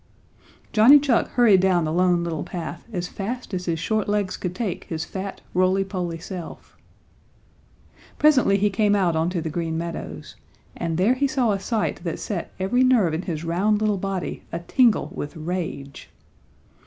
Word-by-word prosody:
Johnny 230 +7 +8
Chuck 275 -5 +2
hurried 230 -6 +5
down 180 -2 +3
the 155 - -2
Lone 175 0 +2
Little 165 -3 -3
Path 175 +3 -7
as 180 -4 -3
fast 225 +4 -5
as 180 -1 -3
his 170 -2 -1
short 215 +3 -1
legs 205 -2 0
could 180 -1 -5
take 195 -4 -3
his 160 -1 -4
fat, 190 +2 -6
rolly 185 +2 +2
poly 180 -3 -4
self. 175 +1 -9 1.4
Presently 260 -10 +4
he 205 +1 +1
came 205 +1 +2
out 180 -5 +2
onto 170 +2 0
the 160 -1 -4
Green 165 0 -2
Meadows, 120 - -6 0.4
and 165 -1 -2
there 200 +7 +4
he 280 +2 +1
saw 260 -5 +1
a 200 - 0
sight 210 -3 -2
that 165 -3 -3
set 190 -6 -4
every 215 +7 +2
nerve 230 -11 +3
in 160 - -1
his 165 -4 -4
round 195 +6 +1
little 210 -2 +1
body 195 -1 -3
a - - -2
tingle 230 +7 +2
with 145 +3 -6
rage. 160 -4 -5
185 Hz, 170 wpm, -23 LUFS, 170-210 Hz, 1.4 s, Johnny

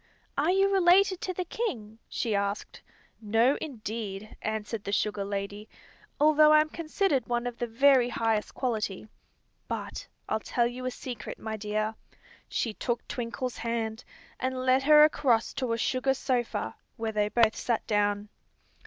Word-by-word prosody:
"Are 295 +4 +1
you 390 +2 +3
related 375 0 +4
to 370 - -2
the 365 0 -3
king?" 230 - -4
she 225 - -1
asked. 200 0 -2 0.4
"No, 225 +6 +3
indeed," 215 -6 -5
answered 215 0 -3
the 200 - -4
sugar 205 0 0
lady, 200 +1 -5 0.5
"although 305 +1 +6
I'm 305 0 +5
considered 315 - 0
one 240 0 -1
of 245 -1 -5
the 240 - -1
very 250 +1 +4
highest 225 -3 -1
quality. 215 -5 -2 0.6
But - - -5 0.2
I'll - - 0
tell 240 +2 0
you 250 +1 -3
a - - +1
secret, 245 -3 -7
my 220 0 -5
dear." 215 +1 -2 0.6
She 225 - -1
took 240 +2 -3
Twinkle's 245 -1 -4
hand 225 0 -3 0.4
and 255 0 -2
led 260 +1 +4
her 300 +2 +7
across 260 -7 +2
to 255 -3 -2
a 230 - +1
sugar 260 +3 +1
sofa, 250 -3 -2 0.2
where 225 -1 -2
they 210 -1 +1
both 225 -1 +3
sat 235 -2 -1
down. 205 -1 0
235 Hz, 155 wpm, -28 LUFS, 215-275 Hz, 0.6 s, her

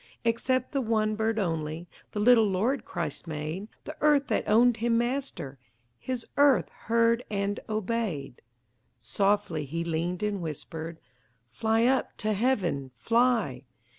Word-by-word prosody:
Except 250 +2 +1
the 275 - 0
one 215 -2 +1
bird 220 +1 0
only 165 -3 -2 0.2
The 210 - -3
little 225 -1 +5
Lord 220 +7 0
Christ 170 -2 -4
made; 155 +6 -4 0.2
The 305 - -7
earth 295 -2 +4
that - - 0
owned 235 +2 +5
Him 230 +1 +1
Master, 240 - -2 0.4
His 255 -2 -4
earth 280 -10 +5
heard 230 +1 +1
and 200 0 -1
obeyed. 210 - -2 0.6
Softly 175 - 0
He 165 +5 -3
leaned 170 +3 -2
and 205 -2 -1
whispered: 160 +1 -6 0.5
"Fly 225 0 +1
up 260 +1 +1
to 215 -1 0
Heaven! 190 - 0
Fly!" 230 - +1
215 Hz, 135 wpm, -28 LUFS, 170-235 Hz, 0.6 s, little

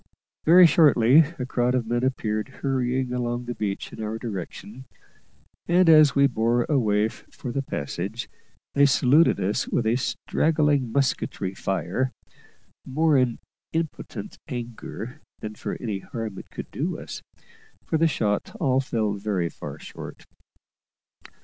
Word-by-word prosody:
Very 175 +3 +8
shortly 150 -2 +6
a 125 - -3
crowd 125 -1 +1
of 125 -3 0
men 120 +2 -1
appeared 110 -4 -1
hurrying 130 -1 0
along 120 0 -2
the 120 - -3
beach 100 -4 -4
in - - -7
our 110 +1 -3
direction, 110 +3 -7 0.8
and, 175 +1 +4
as 155 -4 +7
we 140 0 +5
bore 120 -2 +2
away 110 -7 +2
for 120 +2 -9
the 135 - -1
passage, 100 - -4 0.5
they 140 0 +5
saluted 140 +4 +4
us 105 +7 0
with 120 - 0
a 115 +2 +2
straggling 145 -1 +1
musketry 125 -7 -1
fire, 95 +7 -1 0.7
more 155 +3 +2
in 125 -3 +2 0.4
impotent 160 -1 -4
anger 120 +3 -6 0.2
than 110 0 -6
for - - -5
any 105 -5 -3
harm 110 -1 -6
it - - -12
could - - -8
do - - -2
us, - - -8 0.6
for 160 - 0
the 165 - +5
shot 105 -9 -1
all 130 -4 +2
fell 110 -6 -1
very 100 -4 -1
far - - -8
short. - - -10
125 Hz, 140 wpm, -25 LUFS, 110-140 Hz, 0.8 s, Very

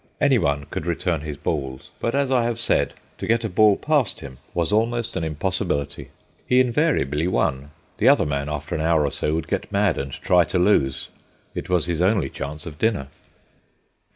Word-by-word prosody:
Anyone 70 - +2
could 80 - -4
return 85 -2 -1
his 75 -2 -6
balls; 70 -3 -4
but, 115 - -1
as 140 -1 +1
I 125 -2 +3
have 120 -1 -1
said, 120 - +1 0.2
to - - -4
get 115 0 +2
a 110 - -2
ball 105 +2 +5
past 150 -7 0
him 65 -2 -10 0.2
was 85 +3 +1
almost 115 +1 0
an - - -1
impossibility. 75 -4 -2 0.4
He 125 - +4
invariably 120 - +1
won; 70 -6 0 0.3
the 115 - +5
other 140 - +4
man, 70 0 -2
after 75 +1 -4
an 80 - -1
hour 80 -2 +3
or 70 - -1
so, 75 - -1
would 80 - -3
get - - -3
mad 100 -3 +2
and 70 0 -4
try 90 +5 +3
to 90 - -2
lose. 90 -8 +2 0.4
It - - -5
was 90 -3 +2
his 85 -1 -1
only 95 -6 +2
chance 75 +2 -6
of 75 -3 -9
dinner. 100 -11 0
85 Hz, 190 wpm, -23 LUFS, 75-110 Hz, 0.4 s, ball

